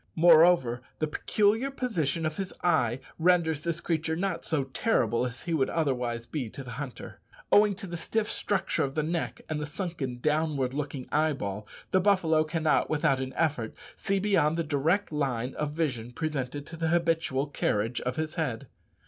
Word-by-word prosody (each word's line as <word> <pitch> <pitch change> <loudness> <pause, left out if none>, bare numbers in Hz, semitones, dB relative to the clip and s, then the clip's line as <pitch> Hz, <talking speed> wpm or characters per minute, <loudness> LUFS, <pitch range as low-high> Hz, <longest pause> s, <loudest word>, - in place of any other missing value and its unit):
Moreover, 160 -7 +6 0.2
the 155 - 0
peculiar 210 - +1
position 170 - -1
of 155 0 -2
his 195 -2 -3
eye 130 -8 +2 0.2
renders 165 -3 +3
this 170 0 -2
creature 160 -1 -1
not 175 -1 -2
so 155 -4 0
terrible 130 - +1
as 120 0 -8
he 170 - -2
would 135 -5 +2
otherwise 125 -7 -1
be 130 -2 -4
to 135 - -8
the 125 - -8
hunter. 135 0 -7 0.3
Owing 205 -1 +6
to 200 +1 -7
the 175 -2 -6
stiff 215 +5 -1
structure 195 -3 0
of 135 0 -3
the 155 - +1
neck, 165 +2 -2
and 155 -1 -2
the 150 - -3
sunken, 150 -7 -4
downward 150 -2 0
looking 140 -2 -4
eyeball, 130 -10 0 0.2
the 185 - +4
buffalo 175 -6 +3
cannot, 160 0 +1
without 140 -3 +2
an 130 0 -4
effort, 140 -9 -1 0.2
see 195 - -1
beyond 190 -6 +2
the 170 - +1
direct 160 +7 +1
line 130 -4 -1
of 150 -1 -3
vision 125 -7 -2
presented 145 -2 -3
to 165 - -9
the 165 0 0
habitual 165 -5 +1
carriage 120 -5 -1
of 125 +1 -2
his 155 0 -2
head. 130 -4 -2
155 Hz, 175 wpm, -28 LUFS, 130-170 Hz, 0.3 s, Moreover